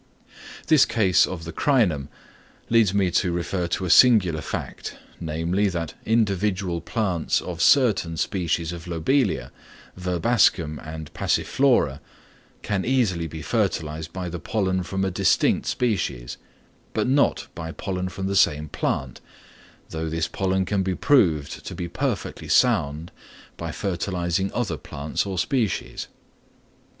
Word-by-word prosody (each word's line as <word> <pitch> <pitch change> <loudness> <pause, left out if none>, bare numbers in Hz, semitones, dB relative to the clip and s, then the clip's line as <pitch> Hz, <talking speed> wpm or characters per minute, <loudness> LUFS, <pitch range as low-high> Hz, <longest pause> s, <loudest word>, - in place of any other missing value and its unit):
This 155 -4 +6
case 95 -7 +3
of 85 -3 -6
the 80 0 -7
Crinum 90 - +2 0.6
leads 115 -4 +5
me 95 -2 +1
to 90 +1 +1
refer 85 +1 -2
to 90 +2 -2
a 90 - 0
singular 95 -11 +6
fact, - - -6 0.2
namely, 85 +5 0
that 85 -4 -4
individual 100 -5 +1
plants 95 -8 0
of 85 -2 -6
certain 105 - +3
species 85 -2 -1
of 85 0 -9
Lobelia, 85 - 0 0.4
Verbascum 90 -3 +1
and 80 -1 -8
Passiflora, 120 - +2 0.6
can 100 -3 -1
easily 110 -11 +1
be 80 0 -8
fertilised 80 -7 -1
by 90 0 -5
the 85 0 -5
pollen 95 -2 -1
from 95 +2 -2
a 95 - -1
distinct 90 0 +2
species, 85 - -1 0.6
but - - +1
not 140 +2 +2
by 80 -1 -6
pollen 90 +1 -3
from 95 +1 -5
the 100 +1 -1
same 75 -5 +3
plant, - - -2 0.7
though 80 0 -3
this 80 0 -1
pollen 95 -1 0
can 100 0 0
be 95 -1 -1
proved 85 - +2
to - - -7
be 85 - -4
perfectly - - -3
sound 75 +4 +2 0.4
by - - -5
fertilising 90 0 -2
other 100 -10 -2
plants 75 +7 -4
or 95 -2 -4
species. 115 - -1
90 Hz, 135 wpm, -24 LUFS, 80-100 Hz, 0.7 s, This